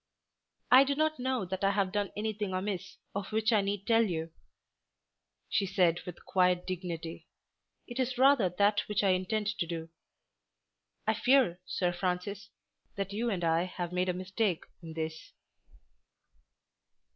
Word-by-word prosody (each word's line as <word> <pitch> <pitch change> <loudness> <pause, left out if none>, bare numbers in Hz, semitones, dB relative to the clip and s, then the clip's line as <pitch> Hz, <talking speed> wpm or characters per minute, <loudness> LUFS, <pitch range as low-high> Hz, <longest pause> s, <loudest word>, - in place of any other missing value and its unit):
"I 255 +2 +9
do 280 +1 0
not 310 -1 +1
know 255 -4 -1
that 190 +2 -4
I 195 - +5
have 195 -2 +1
done 205 0 -1
anything 210 -2 -2
amiss 185 -1 -3 0.2
of 200 +1 -4
which 220 +2 +2
I 210 - +5
need 200 0 -2
tell 230 -1 +4
you," 165 -5 -2 1.2
she 195 - +1
said 180 -3 +2
with 180 - -9
quiet 180 -1 +2
dignity. 170 -3 -5 0.6
"It 240 +1 -7
is 255 -1 0
rather 260 -7 +5
that 205 +3 +3
which 210 0 0
I 195 - +4
intend 210 +3 0
to 170 - 0
do. 165 -1 -5 1.2
I - - +3
fear, 250 -9 +3
Sir 180 -1 0
Francis, 185 +3 -3 0.5
that 195 0 -3
you 235 +3 0
and 185 -5 -2
I 165 +1 +2
have 180 -1 -5
made 180 +1 +1
a - - +1
mistake 185 0 -1 0.2
in 165 -1 -8
this." 160 0 -5
195 Hz, 155 wpm, -31 LUFS, 180-215 Hz, 1.2 s, I